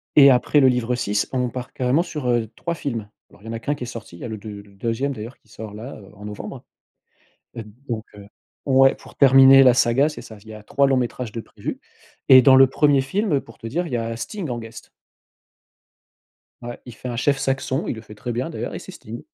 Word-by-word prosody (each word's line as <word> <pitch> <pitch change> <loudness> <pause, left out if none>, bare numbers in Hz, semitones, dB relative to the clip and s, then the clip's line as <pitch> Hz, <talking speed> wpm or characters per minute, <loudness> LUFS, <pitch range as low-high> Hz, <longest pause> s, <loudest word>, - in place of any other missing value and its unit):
et 140 -2 +9
après 130 +4 +3
le 135 - +6
livre 125 -1 +1
6, 105 -4 -1
on 125 -2 -1
part 125 0 -7
carrément 130 +5 +1
sur, 150 -7 -5
heu, 120 -2 +1
3 170 - -3
films. 115 -9 -4 0.2
Alors 100 - -21
il - - -16
y - - -7
en - - -4
a 115 - -4
qu'1 145 +4 -2
qui 135 - -7
est - - -6
sorti, 115 -7 -9
il - - -16
y - - -5
a - - -4
le 110 - -6
deu 110 +1 -10
le 100 -1 -20
2e 115 +7 -2
d'ailleurs 115 +2 -9
qui - - -34
sort, 105 0 -9
là, 115 +6 -8
heu, 100 - -15
en 105 +1 -11
novembre. 105 -1 -8 1.3
Donc 110 -2 -3
heu 100 -1 -12 0.4
Ouais, 135 0 +5
pour - - -16
terminer 135 0 +7
la 125 -2 +6
saga, 125 +4 +3
c'est 150 - -6
ça. 110 - -12
Il - - -20
y - - -8
a 110 - -10
3 140 +6 +1
longs-métrages 125 -3 -1
de 115 +1 -5
prévus - - -7 0.5
et 130 -1 +9
dans 135 0 +7
le 135 0 +7
1er 140 +1 +3
film, 190 +8 -1
heu, 140 - +2
pour 115 - -16
te - - -12
dire, 170 +10 -2
il 140 - -7
y - - +1
a 115 0 -3
Sting 165 - -6
en 120 -1 -3
guest. 115 0 -11 1.7
Ouais. 120 0 -7
Il 120 - -10
fait 125 - -8
un 120 - -4
chef 140 +2 +1
saxon, 135 0 -1
il - - -1
le 110 - -9
fait 105 - -13
très 110 +3 -6
bien, 125 +6 -2
d'ailleurs 165 - -5
et - - -4
c'est - - -11
Sting. 115 +2 -9
125 Hz, 250 wpm, -22 LUFS, 115-135 Hz, 1.7 s, et